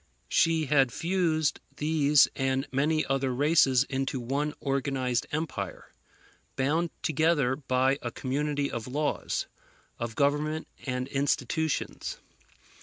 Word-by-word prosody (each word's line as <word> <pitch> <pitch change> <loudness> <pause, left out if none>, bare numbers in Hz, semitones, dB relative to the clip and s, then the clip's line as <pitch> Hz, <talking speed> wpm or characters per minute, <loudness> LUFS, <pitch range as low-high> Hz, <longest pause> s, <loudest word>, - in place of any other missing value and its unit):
She 165 -2 +3
had 135 -3 +3
fused 165 -3 0 0.2
these 150 -2 +4
and 135 0 0
many 150 +4 +1
other 135 -1 0
races 135 -1 +4
into 135 -1 -2
one 140 +5 -2
organized 135 -3 -1
empire, 150 - -4 0.6
bound 155 +6 +1
together 155 -4 +2
by 130 0 +1
a 120 - -3
community 140 +3 -2
of 115 0 -4
laws, 145 +4 -1 0.5
of 115 -1 -4
government 150 +2 0 0.2
and 125 0 -2
institutions. 140 +2 -1
140 Hz, 110 wpm, -28 LUFS, 130-155 Hz, 0.6 s, these